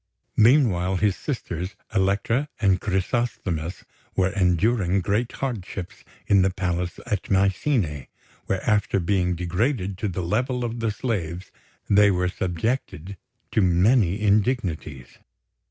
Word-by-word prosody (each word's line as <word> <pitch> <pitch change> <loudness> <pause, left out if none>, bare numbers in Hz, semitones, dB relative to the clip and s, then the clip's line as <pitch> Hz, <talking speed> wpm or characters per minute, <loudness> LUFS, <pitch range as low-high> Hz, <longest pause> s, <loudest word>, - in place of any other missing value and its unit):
Meanwhile, 105 -7 +4
his 100 0 +2
sisters, 95 - -4 0.2
Elektra 100 +8 +1
and 95 -4 +2
Chrysosthemis, 95 -5 -2 0.3
were 95 0 +2
enduring 95 +1 +2
great 105 +7 -1
hardships 100 -8 -5 0.2
in 100 -2 +4
the 95 - +3
palace 90 -1 -2
at 105 -4 -3
Mycene, 95 - +1 0.4
where, 95 +3 -2
after 105 -2 +2
being 90 0 +1
degraded 95 - -1
to 105 - -1
the 95 -1 -3
level 125 +7 -1
of 120 0 -4
the 115 -1 0
slaves, 95 -6 -3 0.4
they 100 0 +5
were 90 -1 +1
subjected 95 - -3 0.4
to 110 - +2
many 95 +2 +3
indignities. 100 - -1
95 Hz, 120 wpm, -24 LUFS, 90-110 Hz, 0.4 s, they